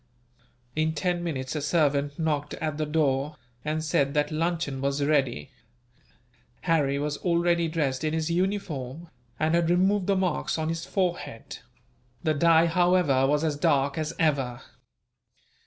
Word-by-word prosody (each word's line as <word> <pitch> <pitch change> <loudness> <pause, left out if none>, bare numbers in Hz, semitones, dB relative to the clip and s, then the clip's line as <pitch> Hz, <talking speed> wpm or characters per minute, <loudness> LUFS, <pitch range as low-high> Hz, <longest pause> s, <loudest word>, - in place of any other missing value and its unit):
In 160 +1 0
ten 175 +2 -1
minutes 135 -5 -3
a 150 - -1
servant 145 -2 +1
knocked 150 -3 -1
at 155 -1 -3
the 155 - -1
door, 150 -1 0 0.3
and 155 +1 -2
said 140 -3 +1
that 150 0 +1
luncheon 160 -4 -1
was 140 +1 0
ready. 135 - 0 1.1
Harry 145 -4 +1
was 145 0 -2
already 170 -1 +1
dressed 150 -4 -1
in 155 - 0
his 160 +1 -1
uniform, 170 -5 -2 0.3
and 155 +1 +1
had 170 -1 +2
removed 190 +2 +2
the 200 - +3
marks 185 -4 0
on 160 0 -1
his 165 +1 -4
forehead; 175 - -3 0.6
the 155 - +2
dye, 165 +2 +5
however, 170 -6 +3
was 150 +2 +1
as 155 -2 0
dark 140 -3 +2
as 155 +1 -3
ever. 135 -6 0
155 Hz, 145 wpm, -26 LUFS, 145-170 Hz, 1.1 s, dye